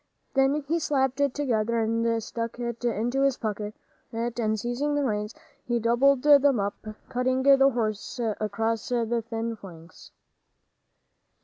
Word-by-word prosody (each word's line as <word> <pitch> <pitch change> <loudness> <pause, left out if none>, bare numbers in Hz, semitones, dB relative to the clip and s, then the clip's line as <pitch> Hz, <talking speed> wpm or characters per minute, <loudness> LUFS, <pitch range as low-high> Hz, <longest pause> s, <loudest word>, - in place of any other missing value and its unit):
Then 270 +2 +2
he 335 +3 +1
slapped 265 -3 0
it 280 -2 +1
together 235 -5 0
and 230 0 0
stuck 230 +1 -5
it 235 -1 -5
into 240 +3 0
his 275 -2 +2
pocket, 210 -1 -4 0.4
and 230 -2 -1
seizing 245 +6 -1
the 290 - +1
reins, 210 -3 -2 0.3
he 240 -1 -1
doubled 250 +4 +3
them 285 -4 +5
up, 200 +2 -4 0.2
cutting 255 +1 0
the 275 0 +6
horse 220 -3 -3 0.2
across 220 +1 -2
the 235 -1 0
thin 230 0 -4
flanks. 170 -5 -13
235 Hz, 135 wpm, -26 LUFS, 220-270 Hz, 0.4 s, the